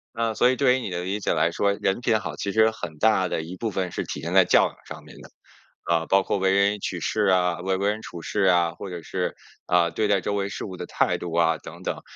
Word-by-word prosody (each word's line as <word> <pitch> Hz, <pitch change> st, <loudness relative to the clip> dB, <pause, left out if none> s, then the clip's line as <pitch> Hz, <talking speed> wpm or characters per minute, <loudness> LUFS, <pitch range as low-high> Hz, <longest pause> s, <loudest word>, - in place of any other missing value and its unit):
啊， 115 Hz, -1 st, 0 dB
所 125 Hz, +3 st, +3 dB
以 130 Hz, -, +2 dB
对 130 Hz, -2 st, +3 dB
于 130 Hz, -, -1 dB
你 115 Hz, -, -5 dB
的 90 Hz, 0 st, -3 dB
理 100 Hz, +3 st, -2 dB
解 100 Hz, -, 0 dB
来 85 Hz, +1 st, +2 dB
说， 100 Hz, +3 st, +1 dB
人 95 Hz, +1 st, -1 dB
品 115 Hz, -2 st, +1 dB
好， 75 Hz, -5 st, -6 dB
其 100 Hz, -, -3 dB
实 110 Hz, 0 st, +4 dB
很 85 Hz, -9 st, -8 dB
大 105 Hz, -4 st, +3 dB
的 -, -, -2 dB
一 85 Hz, +3 st, -8 dB
部 115 Hz, -, -2 dB
分 95 Hz, -3 st, -3 dB
是 -, -, -4 dB
体 70 Hz, -, -6 dB
现 85 Hz, +3 st, -4 dB
在 95 Hz, -2 st, +6 dB
教 -, -, +4 dB
养 -, -, -19 dB
上 -, -, -9 dB
面 -, -, -14 dB
的。 -, -, -13 dB, 0.5 s
啊， 85 Hz, -1 st, 0 dB
包 95 Hz, 0 st, +3 dB
括 100 Hz, -, -1 dB
为 95 Hz, 0 st, +2 dB
人 100 Hz, +1 st, +2 dB
取 90 Hz, -2 st, -4 dB
事 105 Hz, +4 st, 0 dB
啊， 90 Hz, -2 st, +2 dB
为 95 Hz, 0 st, 0 dB
为 100 Hz, +1 st, +1 dB
人 110 Hz, +1 st, -5 dB
处 85 Hz, -, -9 dB
事 -, -, -2 dB
啊， 85 Hz, -2 st, +3 dB
或 100 Hz, -, -8 dB
者 85 Hz, -2 st, -7 dB
是， -, -, -3 dB, 0.3 s
啊， 85 Hz, -1 st, +3 dB
对 105 Hz, +4 st, 0 dB
待 100 Hz, -1 st, +3 dB
周 100 Hz, +3 st, -3 dB
围 100 Hz, 0 st, -1 dB
事 -, -, -6 dB
物 95 Hz, -3 st, -8 dB
的 -, -, -5 dB
态 -, -, +1 dB
度 85 Hz, -, -6 dB
啊 80 Hz, -1 st, +2 dB
等 -, -, -11 dB
等。 -, -, -3 dB
95 Hz, 300 characters per minute, -24 LUFS, 85-105 Hz, 0.5 s, 在